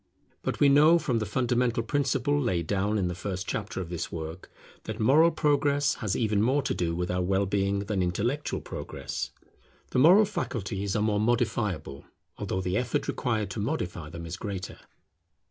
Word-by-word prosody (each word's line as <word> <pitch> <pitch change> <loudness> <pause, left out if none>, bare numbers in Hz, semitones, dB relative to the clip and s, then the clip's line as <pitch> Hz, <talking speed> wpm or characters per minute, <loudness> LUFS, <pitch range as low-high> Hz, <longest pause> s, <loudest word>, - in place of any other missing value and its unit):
But - - -3
we 145 - +6
know 150 +4 +6
from 125 -8 0
the 110 - -3
fundamental 120 +1 +1
principle 145 +2 +1
laid 90 - 0
down 100 +4 0
in 95 -3 +1
the 90 - -2
first 95 +1 -4
chapter 105 -3 -3
of 90 -3 -5
this 85 -1 -4
work, 80 +2 -6 0.4
that 110 +1 -5
moral 145 +9 +5
progress 145 -2 +2
has 105 -5 0
even 105 -3 +1
more 135 +5 +2
to - - -1
do 85 -1 -1
with 90 +1 -2
our 90 0 0
well 95 +2 +1
being 100 0 0
than 100 -1 -1
intellectual 115 +11 -1
progress. - - -5 0.6
The - - +1
moral 180 +10 +7
faculties 105 - -3
are 105 - +1
more 105 -1 +1
modifiable, 105 - -1 0.3
although 95 - -2
the 90 +1 -1
effort 125 -1 -1
required 110 -4 -1
to - - -4
modify 90 - -3
them 85 +1 -7
is 85 +3 -5
greater. 100 -3 -5
105 Hz, 180 wpm, -28 LUFS, 95-130 Hz, 0.6 s, moral